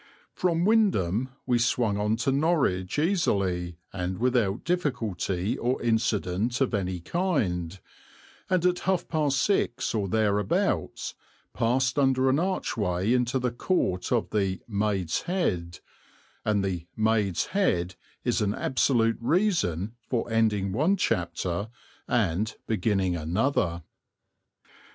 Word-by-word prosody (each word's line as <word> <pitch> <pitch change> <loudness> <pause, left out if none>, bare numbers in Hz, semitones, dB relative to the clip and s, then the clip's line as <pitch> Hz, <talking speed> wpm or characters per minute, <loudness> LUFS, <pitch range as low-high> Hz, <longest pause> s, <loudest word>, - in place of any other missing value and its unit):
From 170 -1 +1
Wymondham 130 - +2 0.2
we 125 -2 +2
swung 115 -3 +1
on 105 +1 +1
to 125 +4 0
Norwich 135 - +1
easily, 100 - 0 0.2
and 90 -1 -3
without 120 -4 +1
difficulty 110 - -1
or 125 +2 0
incident 110 -1 0
of 135 -3 +1
any 95 -3 -1
kind, 95 - -1 0.7
and 180 -2 +2
at 180 0 +2
half 185 -3 +1
past 150 -4 +1
six 195 -10 +1
or 105 -3 0
thereabouts 105 -1 0 0.4
passed 130 +3 +1
under 130 -1 +3
an 140 - +2
archway 110 - 0
into 125 +1 +1
the 125 -1 -1
Court 120 - -1
of 120 -3 +1
the 95 -3 0
"Maid's 100 -5 0
Head"; 90 - -1 0.6
and 100 -2 +1
the 90 -3 -3
"Maid's 110 -4 +1
Head" 90 - +1 0.3
is - - +1
an 105 -1 0
absolute 115 -4 +1
reason 115 - +1 0.2
for 120 -3 -1
ending 105 -4 +2
one 155 - +2
chapter 85 - -1 0.4
and 105 -2 0
beginning 95 -4 0
another. 85 - 0
110 Hz, 120 wpm, -27 LUFS, 95-135 Hz, 0.7 s, under